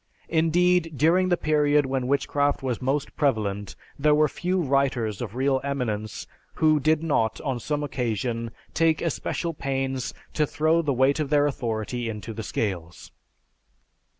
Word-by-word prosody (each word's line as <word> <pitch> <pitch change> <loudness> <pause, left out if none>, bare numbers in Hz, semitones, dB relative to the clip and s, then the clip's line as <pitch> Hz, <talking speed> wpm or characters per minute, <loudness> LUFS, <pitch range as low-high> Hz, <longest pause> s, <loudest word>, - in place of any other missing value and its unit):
Indeed, 165 +1 +2
during 180 +5 +3
the 175 - +3
period 150 -2 +3
when 130 -1 -1
witchcraft 140 +1 +1
was 125 -3 -2
most 135 +3 -1
prevalent 105 -8 -1 0.2
there 150 +1 +4
were 155 0 +4
few 180 +5 -1
writers 135 - 0
of 115 -2 -5
real 135 0 +1
eminence 115 -7 -3 0.3
who 155 -1 +4
did 155 +2 +2
not, 115 -8 +1
on 130 -4 -2
some 150 +4 -2
occasion, 120 -3 -2 0.2
take 160 -1 +3
especial 170 +1 -2
pains 135 -3 -2 0.2
to 150 -1 +1
throw 160 +3 +2
the 150 -3 0
weight 135 +3 +2
of 150 -3 -1
their 145 -1 +4
authority 120 -3 -2
into 110 +1 -6
the 110 - -5
scales. 90 -6 -4
140 Hz, 150 wpm, -25 LUFS, 120-155 Hz, 0.3 s, there